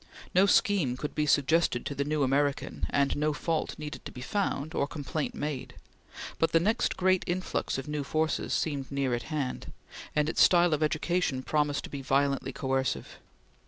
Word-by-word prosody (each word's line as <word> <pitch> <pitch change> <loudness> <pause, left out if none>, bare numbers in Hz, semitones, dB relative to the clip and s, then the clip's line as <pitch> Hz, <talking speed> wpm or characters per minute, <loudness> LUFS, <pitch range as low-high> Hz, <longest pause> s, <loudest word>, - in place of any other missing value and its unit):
No 190 +2 +5
scheme 180 -12 +3
could 150 - -4
be 150 0 0
suggested 145 -2 +2
to - - -3
the 140 - -1
new 150 0 0
American, 140 +1 0
and 140 -1 +1
no 150 +1 +1
fault 160 +2 -2
needed 150 0 -7
to - - -6
be 125 - -9
found, 155 -2 -2
or 140 - 0
complaint 145 0 -4
made; 145 -3 -4 0.6
but 165 - +2
the 165 - +6
next 215 +7 +1
great 185 0 +3
influx 180 -4 -1
of 135 - -5
new 150 -1 -2
forces 155 +3 -1
seemed 140 -4 -1
near 140 -2 0
at 120 - -1
hand, 145 -5 -3 0.4
and 150 0 +2
its - - +1
style 175 -2 +6
of 155 - 0
education 155 -3 0
promised 150 -1 0
to - - -9
be 140 - -5
violently 135 +1 +1
coercive. 135 -1 -2
150 Hz, 180 wpm, -29 LUFS, 140-160 Hz, 0.6 s, the